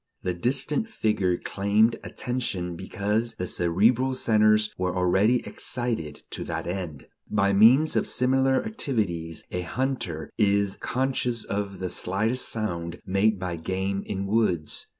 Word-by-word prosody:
The 90 - 0
distant 135 - 0
figure 105 - 0
claimed 105 +3 +2
attention 110 -9 -3
because 105 +5 -2
the 90 - -3
cerebral 115 +11 +2
centers 110 -2 +3
were 90 0 -2
already 95 +7 +3
excited 115 - -3
to - - -4
that - - -4
end. 85 -5 -5 0.2
By 100 -1 +2
means 125 +10 +6
of - - +1
similar 130 - +2
activities 100 - -2
a 90 - -2
hunter 90 - -3
is 100 -2 +2
conscious 125 -3 -1
of 100 -1 -3
the 90 -1 -4
slightest 110 +7 -1
sound 85 -6 -3
made 100 +3 +2
by 90 -2 -4
game 95 +4 -2
in 100 0 -3
woods. 100 -7 0
100 Hz, 130 wpm, -26 LUFS, 90-120 Hz, 0.2 s, means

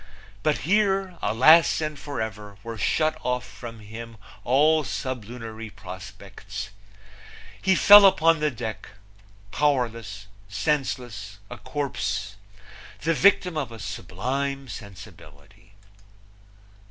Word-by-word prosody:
But 150 +5 +1
here 195 -2 +1
alas 155 +9 +5
and 155 -1 -2
forever 110 -7 -6
were 115 0 -6
shut 155 +9 +1
off 125 0 -1
from 115 -2 -10
him 115 +2 -9 0.3
all 150 +5 +3
sublunary 115 -4 -6
prospects. 95 -3 -9 0.9
He 190 0 +3
fell 205 0 +9
upon 165 -3 +3
the 150 0 +1
deck 110 -4 -6 0.6
powerless, 115 -9 -1 0.2
senseless, 110 -2 -2
a 120 - -7
corpse 130 -7 -3 0.7
the 165 +2 +1
victim 180 0 +3
of 140 -6 -3
a 115 - -9
sublime 135 +9 -4
sensibility! 95 -3 -13
125 Hz, 100 wpm, -25 LUFS, 105-150 Hz, 0.9 s, fell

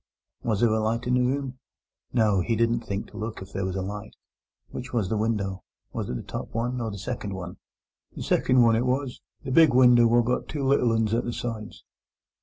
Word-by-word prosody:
Was 110 -4 -1
there 115 -2 +4
a 110 - +1
light 115 +2 -1
in 125 - +1
the 125 - +3
room? 130 0 -1 0.5
No, 105 -5 +3
he 115 +5 0
didn't 115 +1 +2
think 100 -2 -4
to - - -11
look 110 0 -5
if 95 +1 -11
there 95 - -2
was 95 - -4
a 95 - -2
light. 105 +2 -7 0.6
Which 130 +1 -7
was 110 -6 0
the - - 0
window? 105 -3 -1 0.3
Was - - -3
it - - -2
the - - -5
top - - -6
one 120 +2 -1
or 115 - -2
the 100 - -6
second 100 -1 -4
one? 90 -1 -7 0.6
The - - -5
seckind 125 -1 +3
one 115 -1 +5
it 120 +3 +1
was—the 130 0 -4
big 155 -2 +6
winder 120 -2 +7
what 120 0 +3
got 125 +1 -1
two 145 -3 -4
little 130 -3 +3
uns 110 -1 +1
at 120 +1 +1
the 120 - -3
sides. 115 -3 -6
115 Hz, 220 wpm, -26 LUFS, 105-125 Hz, 0.6 s, winder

